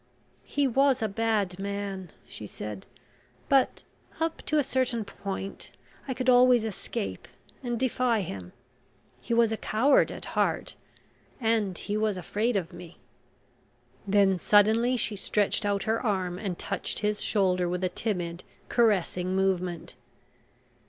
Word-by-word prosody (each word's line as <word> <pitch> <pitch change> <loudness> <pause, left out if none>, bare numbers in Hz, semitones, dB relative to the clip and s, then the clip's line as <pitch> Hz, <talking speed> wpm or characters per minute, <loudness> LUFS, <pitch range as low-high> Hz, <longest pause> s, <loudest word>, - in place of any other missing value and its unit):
"He 285 -1 +1
was 270 -1 +3
a - - +2
bad 205 -3 0
man," 200 -2 -4 0.2
she 105 - -8
said. 105 -1 -7 0.6
"But, 270 -2 +3 0.4
up 325 0 -1
to 305 - +2
a 295 - +4
certain 255 -4 0
point, 195 0 -6 0.4
I 260 - -2
could 255 +1 -3
always 250 -2 +6
escape 220 +1 -5 0.3
and 240 -3 -2
defy 250 -3 +1
him. 95 - -6 0.7
He 230 - -1
was 230 -1 +4
a 220 - -1
coward 245 +8 +3
at - - -7
heart, - - 0 0.7
and 220 -6 +1
he 205 0 -3
was 215 -2 0
afraid 215 +6 -1
of 185 -2 -2
me." 175 -1 -11 1.1
Then 195 -2 +4
suddenly 220 +6 +4
she 215 -2 -1
stretched 205 +1 +1
out 200 -1 0
her 220 +1 0
arm 185 -5 -1
and 190 -4 -3
touched 200 - -3
his 210 0 0
shoulder 185 -4 +2
with 180 +1 -2
a 185 - +2
timid, 175 -4 -3 0.3
caressing 185 -5 +2
movement. 185 -3 -1
205 Hz, 140 wpm, -28 LUFS, 185-235 Hz, 1.1 s, always